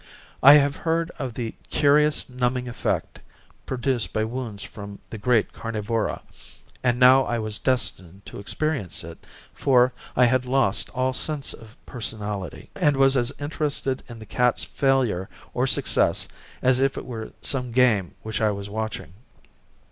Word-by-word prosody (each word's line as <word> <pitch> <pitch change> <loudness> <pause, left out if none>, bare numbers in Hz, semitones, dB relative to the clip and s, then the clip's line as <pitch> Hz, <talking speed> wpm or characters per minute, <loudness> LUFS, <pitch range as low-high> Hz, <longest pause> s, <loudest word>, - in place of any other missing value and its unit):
I 140 +2 +10
have 140 -1 +3
heard 165 0 -1
of 130 -4 -4
the 115 -3 -4 0.2
curious 150 +1 +3
numbing 125 0 -1
effect 120 - -2 0.5
produced 130 -2 -1
by 110 - 0
wounds 110 -3 -5
from 100 -1 -9
the 110 - -6
great 120 0 +2
carnivora, 115 0 -2 0.6
and 125 -1 +2
now 130 +1 +7
I 120 - -1
was 110 -2 -4
destined 100 -7 -1
to - - -9
experience 125 - -2
it, 85 0 -11 0.3
for 125 -2 +3 0.2
I 125 - +5
had 125 +1 +1
lost 125 -6 +1
all 130 +1 +1
sense 150 +1 -1
of 110 0 -14
personality, 105 -5 -5
and 145 -2 +2
was 135 0 +5
as 125 0 +1
interested 145 -2 -2
in 120 - -8
the 110 - -10
cat's 125 +3 +1
failure 130 -9 0 0.2
or - - +1
success - - +3 0.4
as 130 0 +4
if 135 0 +1
it - - -5
were 115 -3 -7
some 125 -3 +1
game 115 -7 +2
which 110 0 -3
I 110 - +3
was 100 -1 -4
watching. 110 -6 -4
125 Hz, 155 wpm, -24 LUFS, 110-135 Hz, 0.6 s, I